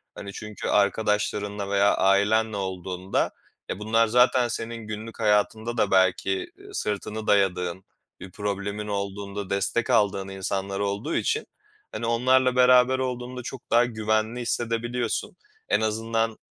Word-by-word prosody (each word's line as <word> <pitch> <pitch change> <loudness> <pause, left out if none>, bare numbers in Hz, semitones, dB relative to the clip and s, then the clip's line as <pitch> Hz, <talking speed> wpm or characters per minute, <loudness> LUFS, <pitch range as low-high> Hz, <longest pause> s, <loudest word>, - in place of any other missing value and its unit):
Hani, 100 0 -8
çünkü 105 -1 -6
arkadaşlarınla 105 0 0
veya 100 0 +4
ailenle 105 +2 +3
olduğunda, 95 0 -2 0.4
e, 95 - -3
bunlar 115 +1 +2
zaten 125 +1 +4
senin 115 -1 -5
günlük 110 +2 -7
hayatında 110 +2 +1
da 105 - +1
belki, 95 - +2
ııı, 400 +1 -13
sırtını 105 - -3
dayadığın, 95 -3 +1 0.4
bir 95 - -10
problemin 100 +1 -3
olduğunda 100 -1 -4
destek 100 +4 0
aldığın 100 -2 +2
insanlar 95 0 -3
olduğu 100 +9 -2
için, 445 - 0 0.5
hani, 115 - -4
onlarla 130 +2 +3
beraber 125 +1 +5
olduğunda 125 -1 -4
çok 130 0 -8
daha 120 +1 +5
güvenli 110 +1 -1
hissedebiliyorsun. 120 +4 -2 0.3
En - - +3
azından, 115 +1 -1
110 Hz, 125 wpm, -25 LUFS, 100-120 Hz, 0.5 s, beraber